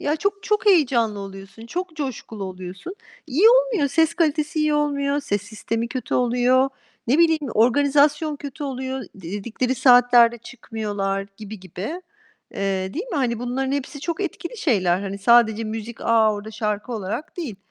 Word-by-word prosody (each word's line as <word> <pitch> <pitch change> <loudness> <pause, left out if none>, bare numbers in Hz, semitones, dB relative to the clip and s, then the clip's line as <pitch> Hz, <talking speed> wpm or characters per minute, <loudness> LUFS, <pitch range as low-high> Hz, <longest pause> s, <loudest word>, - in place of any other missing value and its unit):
Ya 295 +2 0
çok 400 +4 -2
çok 425 0 0
heyecanlı 245 - +3
oluyorsun, 195 +2 -10
çok 350 +5 -5
coşkulu 235 -7 -5
oluyorsun. 185 - -8 0.3
İyi 320 - +3
olmuyor, - - +3
ses 320 +3 +2
kalitesi 310 -1 0
iyi 305 -1 +2
olmuyor, 285 -1 0
ses 205 -8 -2
sistemi 230 +2 -4
kötü 255 +1 -4
oluyor, 250 +2 +3 0.4
ne 275 +7 +3
bileyim, 325 -2 +4
organizasyon 285 +5 +3
kötü 285 +1 -7
oluyor. 265 -1 -4
Dedikleri 205 +7 -3
saatlerde 245 -2 +5
çıkmıyorlar, 205 -5 -4
gibi 215 -1 -9
gibi. 195 - -6 0.5
Eee, 190 -1 -2
değil 380 +10 -4
mi? 390 - -4
Hani 240 -5 0
bunların 255 +3 -2
hepsi 285 +1 -4
çok 335 +5 -3
etkili 380 +2 -5
şeyler. 185 - +2
Hani 200 0 -5
sadece 225 0 +4
müzik, 225 +1 -6
"A, 225 -2 +3
orada 205 +1 -7
şarkı." 210 +1 -3
olarak 215 - -5
değil. 275 - -5
245 Hz, 155 wpm, -22 LUFS, 215-295 Hz, 0.5 s, saatlerde